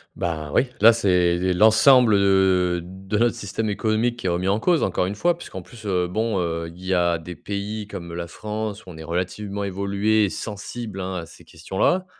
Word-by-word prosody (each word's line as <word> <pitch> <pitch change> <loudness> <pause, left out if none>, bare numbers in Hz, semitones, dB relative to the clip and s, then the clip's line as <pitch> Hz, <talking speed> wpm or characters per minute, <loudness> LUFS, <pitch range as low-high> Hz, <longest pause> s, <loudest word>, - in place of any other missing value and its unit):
Bah 80 -3 -3
oui, 130 - +3
là 115 +2 +8
c'est 90 -4 +2
l'ensemble, 110 +3 +6
heu, 95 -3 +3
de 95 +3 -5
notre 120 0 +3
système 105 +2 -4
économique 110 +3 0
qui 95 - -3
est - - +2
remis 90 +2 -1
en 100 +3 +2
cause, 170 +6 +2
encore 90 -1 0
une 100 - -4
fois. 175 +9 +1
Puisqu'en 95 - -9
plus, 110 +3 -14
heu, 90 -2 +1
bon, 110 +2 -1
heu, 85 -1 -2
il 90 +2 -13
y 95 - 0
a 85 -1 +2
des 85 +1 -9
pays 105 +1 -5
comme 85 -4 -8
la 85 0 -4
France 105 +3 -5
où - - -12
on 80 - -11
est 80 - -8
relativement 95 +4 -3
évolué 100 +2 +1
et 100 - -1
sensible, 105 0 -6
hein, 95 0 -4
à 85 -2 -4
ces - - -16
questions-là. 95 - -1
100 Hz, 205 wpm, -23 LUFS, 90-110 Hz, -, là